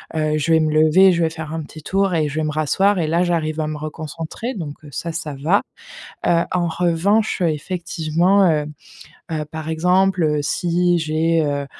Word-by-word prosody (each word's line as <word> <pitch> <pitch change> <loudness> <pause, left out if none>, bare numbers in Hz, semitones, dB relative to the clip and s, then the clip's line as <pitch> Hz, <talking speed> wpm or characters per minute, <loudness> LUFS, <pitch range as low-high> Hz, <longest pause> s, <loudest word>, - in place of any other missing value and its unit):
heu, 155 -1 0
je 155 +2 -1
vais 160 - +5
me 155 -1 0
lever, 155 +5 +5
je 170 0 +1
vais 165 - +2
faire 160 -1 -7
un 160 - -3
petit 155 +1 -12
tour 195 +1 0
et 155 -2 +1
je 140 - -7
vais 155 - 0
me 155 - -1
rasseoir 185 +6 +1
et 160 - 0
là 170 +3 +2
j'arrive 160 -3 -1
à 155 - -2
me 155 0 -4
reconcentrer, 160 - -6
donc, 160 -7 -5
heu, - - -11
ça, 170 +5 -4
ça 155 -3 -5
va. 180 +8 +3 0.7
Heu, 170 0 +3
en 175 -2 0
revanche, 180 +6 +1
heu, 170 - +3
effectivement, 170 +3 +1
heu, 150 -2 0 0.7
heu, 155 -1 -2
par 160 -1 -6
exemple, 180 +3 +2
heu, 150 -1 +1
si 175 +4 +1
j'ai, 160 +1 +1
heu, 140 -1 -2
160 Hz, 205 wpm, -20 LUFS, 155-180 Hz, 0.7 s, vais